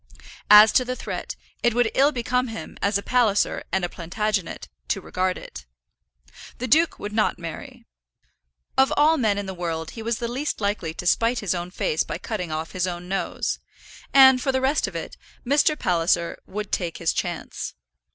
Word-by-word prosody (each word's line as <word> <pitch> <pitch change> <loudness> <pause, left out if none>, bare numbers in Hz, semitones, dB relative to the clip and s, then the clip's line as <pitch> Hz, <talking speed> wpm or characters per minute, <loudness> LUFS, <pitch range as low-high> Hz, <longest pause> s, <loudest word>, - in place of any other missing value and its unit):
As 210 +1 +9
to 255 - +3
the 255 0 -3
threat, - - -5 0.3
it 240 -1 +2
would 240 -2 +2
ill 280 +2 +4
become 250 -1 0
him, 225 -1 -7
as 200 0 +2
a 200 - -6
Palliser 230 -5 +2
and 190 -2 +1
a - - -2
Plantagenet, 195 +2 -3 0.2
to - - 0
regard 185 0 -2
it. 60 - -10 0.9
The 255 - -3
duke 320 +6 +3
would 205 +1 -6
not 215 0 +1
marry. 165 -2 -8 0.9
Of 265 - +5
all 310 +2 +5
men 215 -6 +1
in 205 - -3
the 190 - -5
world 165 -3 -4
he 225 - -8
was 230 0 -1
the 235 - -3
least 265 +6 -3
likely 200 -6 -2
to 180 - -6
spite 230 +6 +2
his 200 -6 -1
own 175 0 -4
face 460 - -1
by - - -5
cutting 180 -7 -4
off 155 +1 -4
his 185 -1 -1
own 175 0 -5
nose; 195 +1 -2 0.5
and, 265 -2 +7
for 270 - +1
the 260 - +1
rest 265 +3 +1
of - - -8
it, - - -6 0.3
Mr. 290 +3 +3
Palliser 170 - +1
would 210 +1 -5
take 175 -3 -2
his 165 - 0
chance. 175 -2 -4
210 Hz, 190 wpm, -24 LUFS, 180-250 Hz, 0.9 s, As